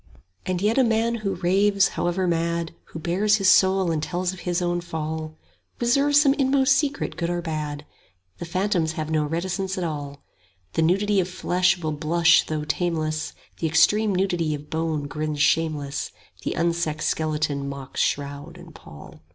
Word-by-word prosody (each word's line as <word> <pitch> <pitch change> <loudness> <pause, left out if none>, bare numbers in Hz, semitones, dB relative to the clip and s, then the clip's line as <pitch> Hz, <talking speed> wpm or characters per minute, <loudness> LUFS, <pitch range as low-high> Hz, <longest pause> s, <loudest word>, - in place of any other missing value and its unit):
And 185 0 -1
yet 220 +5 +2
a - - +6
man 230 0 +1
who 195 -2 -1
raves, 195 +3 +3
however 175 +2 -1
mad, 170 0 -1
Who - - -10
bares 185 +6 +2
his 195 -3 +6
heart 190 -2 +1
and 155 -2 -1
tells 180 +3 -2
of 185 - -10
his 175 0 -1
own 175 -1 -1
fall, 155 -1 -5 0.4
Reserves 280 +4 +4
some 280 -2 +4
inmost 270 0 +3
secret 295 -2 -1
good 170 -1 -2
or 175 0 -1
bad: 150 -3 -4
10 150 - -24 0.5
The - - -5
phantoms 180 -2 0
have 155 0 -4
no 155 -1 +2
reticence 185 +4 -2
at 185 - -2
all: 145 -3 -5 0.5
The - - +1
nudity 195 +5 +2
of 180 -1 0
flesh 185 0 +1
will 160 -3 -3
blush 165 +3 +3
though 155 -1 -2
tameless 155 -1 -2 0.3
The 165 - 0
extreme 200 +6 +3
nudity 175 -5 0
of 150 +1 -11
bone 160 -2 -1
grins 150 0 -4
shameless, 150 -2 0 0.3
The - - -2
unsexed 165 -2 0
skeleton 150 -3 -1
mocks 140 -1 -5
shroud 145 +4 -2
and 175 -2 -13
pall. 75 - -13
170 Hz, 170 wpm, -24 LUFS, 155-190 Hz, 0.5 s, a